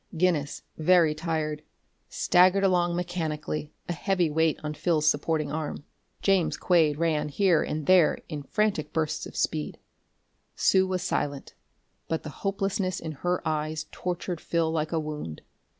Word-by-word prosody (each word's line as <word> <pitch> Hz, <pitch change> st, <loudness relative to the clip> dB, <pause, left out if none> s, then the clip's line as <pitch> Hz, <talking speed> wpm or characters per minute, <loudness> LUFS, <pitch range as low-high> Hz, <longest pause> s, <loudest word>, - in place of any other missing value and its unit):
Guinness, 160 Hz, -5 st, 0 dB, 0.2 s
very 165 Hz, -1 st, +5 dB
tired, 155 Hz, -1 st, -2 dB, 0.5 s
staggered 185 Hz, +2 st, +4 dB
along 175 Hz, -2 st, +2 dB
mechanically, 155 Hz, -4 st, -3 dB, 0.2 s
a 175 Hz, -, -1 dB
heavy 180 Hz, -1 st, 0 dB
weight 160 Hz, 0 st, +2 dB
on 150 Hz, 0 st, -3 dB
Phil's 155 Hz, -1 st, +1 dB
supporting 155 Hz, 0 st, +1 dB
arm; 155 Hz, -1 st, -4 dB, 0.4 s
James 195 Hz, -4 st, +2 dB
Quade 160 Hz, -5 st, +3 dB
ran 155 Hz, -2 st, 0 dB
here 175 Hz, +1 st, +3 dB
and 155 Hz, -1 st, -3 dB
there 180 Hz, -2 st, +5 dB
in 150 Hz, -3 st, -5 dB
frantic 195 Hz, -1 st, 0 dB
spurts 155 Hz, -1 st, -2 dB
of -, -, -11 dB
speed. 75 Hz, -1 st, -1 dB, 0.8 s
Sue 190 Hz, 0 st, +3 dB
was 185 Hz, -1 st, -2 dB
silent, 145 Hz, -4 st, -2 dB, 0.5 s
but 160 Hz, -, -2 dB
the 155 Hz, -, -6 dB
hopelessness 195 Hz, -2 st, -1 dB
in 160 Hz, -, -5 dB
her 175 Hz, +5 st, -2 dB
eyes 155 Hz, 0 st, -2 dB
tortured 180 Hz, -1 st, -4 dB
Phil 165 Hz, -1 st, 0 dB
like 155 Hz, -1 st, -1 dB
a 165 Hz, -, +1 dB
wound. 150 Hz, -, -6 dB
160 Hz, 145 wpm, -27 LUFS, 150-180 Hz, 0.8 s, very